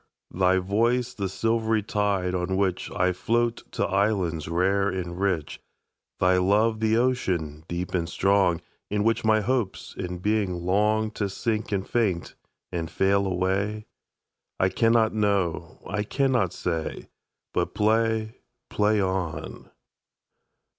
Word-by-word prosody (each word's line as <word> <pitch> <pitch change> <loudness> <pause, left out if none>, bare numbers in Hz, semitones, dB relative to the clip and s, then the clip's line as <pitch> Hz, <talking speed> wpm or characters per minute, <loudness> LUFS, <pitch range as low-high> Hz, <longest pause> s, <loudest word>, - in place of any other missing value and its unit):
Thy 95 0 +3
voice 115 +6 +1
the 100 -5 -3
silvery 110 +1 0
tide 100 -3 0
on 90 +1 -1
whichI 90 -1 0
float 120 +3 0
to - - 0
islands 95 -6 0
rare 95 +4 +2
and 90 -2 -4
rich? 95 -6 -1 0.6
Thy 90 0 +4
love 105 +4 +2
the 110 0 +2
ocean, 90 - 0
deep 85 +1 -4
and 85 -2 -1
strong, 95 -3 +2 0.3
In 105 0 0
which 115 +1 +1
my 110 -1 +4
hopes 115 -3 -2
and 90 -1 -5
being 100 -3 0
longTo 105 +3 +1
sink 110 +2 -2
and 100 -1 -1
faint 100 -8 0 0.4
and 85 -2 -3
fail 100 +1 +2
away?I 95 +1 -3
cannot 115 +3 +3
know. 95 -5 0
I 105 - -1
cannot 125 - +1
say. 85 -3 -4 0.4
But - - -1
play, 110 +1 +1 0.3
play 105 0 +2
on. 95 -4 -3
100 Hz, 120 wpm, -26 LUFS, 90-110 Hz, 0.6 s, Thy